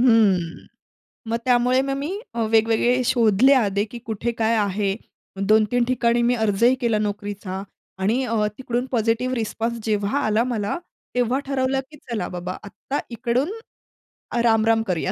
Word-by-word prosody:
हं. 205 Hz, -9 st, +3 dB, 0.6 s
मग 230 Hz, -, +1 dB
त्यामुळे 250 Hz, +1 st, +3 dB
मग 275 Hz, 0 st, -2 dB
मी 290 Hz, +5 st, -3 dB, 0.2 s
अ, 230 Hz, -, -1 dB
वेगवेगळे 230 Hz, +3 st, +3 dB
शोधले 235 Hz, +2 st, +4 dB
आधी, 205 Hz, -5 st, +2 dB
की 235 Hz, +2 st, -9 dB
कुठे 225 Hz, +2 st, -2 dB
काय 225 Hz, +1 st, +3 dB
आहे. 200 Hz, -1 st, 0 dB, 0.5 s
2-3 220 Hz, +3 st, +3 dB
ठिकाणी 240 Hz, -1 st, +1 dB
मी 245 Hz, +1 st, +3 dB
अर्जही 220 Hz, +2 st, +3 dB
केला 230 Hz, -4 st, +1 dB
नोकरीचा 205 Hz, -2 st, -4 dB, 0.4 s
आणि 220 Hz, +7 st, +1 dB
अ, 225 Hz, -3 st, +1 dB
तिकडून 245 Hz, -1 st, -2 dB
पॉझिटिव्ह 235 Hz, +2 st, +1 dB
रिस्पॉन्स 230 Hz, 0 st, -2 dB
जेव्हा 210 Hz, +3 st, 0 dB
आला 215 Hz, +2 st, +2 dB
मला 225 Hz, +1 st, -2 dB, 0.4 s
तेव्हा 245 Hz, +1 st, +1 dB
ठरवलं, 265 Hz, -1 st, 0 dB
की 305 Hz, -, -13 dB
"चला 210 Hz, -6 st, -2 dB
बाबा 180 Hz, 0 st, -5 dB
आत्ता 265 Hz, +7 st, -5 dB
इकडून 245 Hz, -, -1 dB, 0.9 s
राम-राम 225 Hz, -1 st, +3 dB
करूया." 185 Hz, -3 st, -1 dB
230 Hz, 145 wpm, -23 LUFS, 210-245 Hz, 0.9 s, शोधले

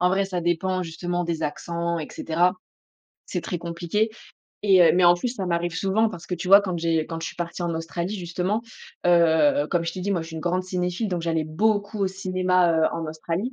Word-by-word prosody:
en 180 Hz, -, +4 dB
vrai 195 Hz, +2 st, +2 dB
ça 185 Hz, -2 st, -3 dB
dépend 180 Hz, +2 st, 0 dB
justement 175 Hz, +1 st, -3 dB
des 165 Hz, -2 st, -3 dB
accents 170 Hz, +2 st, -3 dB
et 150 Hz, -, -6 dB
cetera. 175 Hz, +3 st, +1 dB, 0.8 s
C'est -, -, -3 dB
très 175 Hz, -, -4 dB
compliqué 170 Hz, +6 st, -1 dB, 0.6 s
et 190 Hz, -2 st, +6 dB
heu 170 Hz, -, +6 dB
mais 180 Hz, 0 st, +4 dB
en 175 Hz, 0 st, +7 dB
plus 175 Hz, +8 st, -2 dB
ça 200 Hz, -6 st, -3 dB
m'arrive 170 Hz, -1 st, -1 dB
souvent, 200 Hz, +5 st, +2 dB
parce 170 Hz, -6 st, -9 dB
que 180 Hz, -, -2 dB
tu 180 Hz, +1 st, -5 dB
vois 200 Hz, +2 st, +9 dB
quand 185 Hz, -3 st, -3 dB
j'ai 165 Hz, -1 st, +1 dB
quand 165 Hz, -1 st, -5 dB
je 165 Hz, -, -4 dB
suis -, -, -7 dB
partie 175 Hz, +1 st, -4 dB
en 170 Hz, -1 st, -1 dB
Australie 170 Hz, +4 st, -3 dB
justement, 180 Hz, +4 st, -2 dB, 0.4 s
heu, 175 Hz, -, +4 dB
comme 175 Hz, -2 st, +1 dB
je 165 Hz, -, -2 dB
t'ai 185 Hz, -, -6 dB
dit 195 Hz, +3 st, -2 dB
moi 175 Hz, -4 st, 0 dB
je 165 Hz, -, -9 dB
suis 160 Hz, -, -9 dB
une -, -, -4 dB
grande 180 Hz, +2 st, 0 dB
cinéphile 180 Hz, +3 st, -2 dB
donc 180 Hz, -3 st, -2 dB
j'allais 165 Hz, -1 st, 0 dB
beaucoup 205 Hz, +6 st, 0 dB
au 200 Hz, -, +2 dB
cinéma, 185 Hz, -2 st, +1 dB
heu, 160 Hz, -1 st, +3 dB
en 165 Hz, -1 st, -3 dB
Australie, 165 Hz, +9 st, -3 dB
175 Hz, 230 wpm, -24 LUFS, 170-190 Hz, 0.8 s, vois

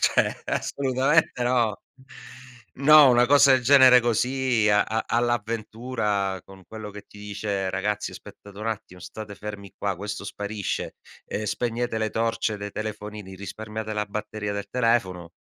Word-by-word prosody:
cioè, -, -, +1 dB
assolutamente 135 Hz, +1 st, +1 dB
no". 120 Hz, -4 st, +1 dB, 0.9 s
No, 145 Hz, 0 st, +7 dB
una 120 Hz, 0 st, +4 dB
cosa 140 Hz, 0 st, +6 dB
del 130 Hz, -1 st, +3 dB
genere 130 Hz, -2 st, +8 dB
così, 120 Hz, -1 st, +1 dB
a 105 Hz, -, +4 dB
a 110 Hz, 0 st, -2 dB
all'avventura, 115 Hz, -3 st, -1 dB
con 95 Hz, -1 st, -15 dB
quello 110 Hz, -2 st, -8 dB
che 105 Hz, -, -9 dB
ti 105 Hz, -, -15 dB
dice: 100 Hz, -2 st, -3 dB
"Ragazzi, 105 Hz, +2 st, -2 dB
aspettate 100 Hz, -1 st, -13 dB
un 115 Hz, -, -2 dB
attimo, 105 Hz, -5 st, -6 dB
state 105 Hz, +2 st, -8 dB
fermi 100 Hz, -1 st, -8 dB
qua!", 100 Hz, -3 st, -2 dB
questo 100 Hz, +1 st, -6 dB
sparisce, 100 Hz, 0 st, -4 dB, 0.3 s
ehm, 105 Hz, -, -4 dB
"Spegnete 120 Hz, +1 st, -2 dB
le 110 Hz, -1 st, -1 dB
torce 115 Hz, -1 st, -1 dB
dei 100 Hz, 0 st, -6 dB
telefonini, 105 Hz, -2 st, -6 dB
risparmiate 110 Hz, +2 st, -6 dB
la 105 Hz, 0 st, -2 dB
batteria 105 Hz, 0 st, -4 dB
del 100 Hz, 0 st, -5 dB
telefono!". 95 Hz, -8 st, 0 dB
110 Hz, 145 wpm, -25 LUFS, 100-120 Hz, 0.9 s, genere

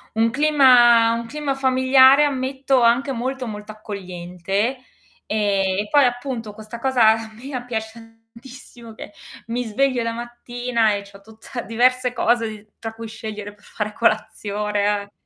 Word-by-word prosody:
Un 225 Hz, +1 st, +2 dB
clima 250 Hz, -5 st, +5 dB
un 235 Hz, 0 st, -3 dB
clima 290 Hz, 0 st, -3 dB
familiare, 260 Hz, +1 st, +5 dB
ammetto 265 Hz, -1 st, 0 dB
anche 240 Hz, +4 st, +3 dB
molto 260 Hz, +1 st, -3 dB
molto 210 Hz, 0 st, -7 dB
accogliente, 195 Hz, +2 st, -4 dB, 0.5 s
ehm, 200 Hz, -3 st, 0 dB
e 210 Hz, -, -2 dB
poi 290 Hz, -1 st, +5 dB
appunto 245 Hz, -3 st, -3 dB
questa 220 Hz, +2 st, -10 dB
cosa 245 Hz, -5 st, +4 dB, 0.2 s
mia 255 Hz, +2 st, -6 dB
piace 220 Hz, -3 st, -5 dB, 0.4 s
tantissimo 240 Hz, -1 st, -13 dB
che -, -, -10 dB, 0.4 s
mi 240 Hz, +2 st, -2 dB
sveglio 255 Hz, +3 st, 0 dB
la 230 Hz, 0 st, -2 dB
mattina 240 Hz, -1 st, -2 dB
e 200 Hz, 0 st, -4 dB
c'ho 200 Hz, 0 st, -16 dB
tutta 220 Hz, +3 st, -9 dB
diverse 250 Hz, +2 st, +1 dB
cose 235 Hz, -2 st, +1 dB
di 215 Hz, -1 st, -10 dB
tra 225 Hz, -1 st, -6 dB
cui 225 Hz, 0 st, -8 dB
scegliere 210 Hz, -2 st, -7 dB
per 205 Hz, -, -26 dB
fare 210 Hz, 0 st, -5 dB
colazione. 210 Hz, -2 st, -1 dB
230 Hz, 140 wpm, -21 LUFS, 210-255 Hz, 0.5 s, clima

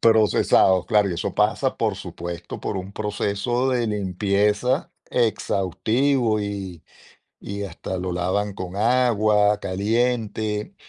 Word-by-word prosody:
Procesados, 105 Hz, -4 st, +4 dB
claro, 105 Hz, -4 st, +3 dB
y -, -, -2 dB
eso -, -, -3 dB
pasa, -, -, +1 dB
por -, -, 0 dB
supuesto, 85 Hz, 0 st, -7 dB
por 100 Hz, -, -3 dB
un 95 Hz, +1 st, -6 dB
proceso 105 Hz, +5 st, -1 dB
de 120 Hz, -2 st, +1 dB
limpieza 105 Hz, -, 0 dB, 0.2 s
exhaustivo 115 Hz, +2 st, +1 dB
y 100 Hz, -5 st, -5 dB, 0.6 s
y 100 Hz, 0 st, -5 dB
hasta 95 Hz, 0 st, -5 dB
lo 90 Hz, 0 st, -3 dB
lavan 95 Hz, +4 st, -1 dB
con 95 Hz, -2 st, -7 dB
agua 110 Hz, -3 st, +3 dB
caliente. 110 Hz, -, -1 dB
105 Hz, 115 wpm, -23 LUFS, 95-115 Hz, 0.6 s, Procesados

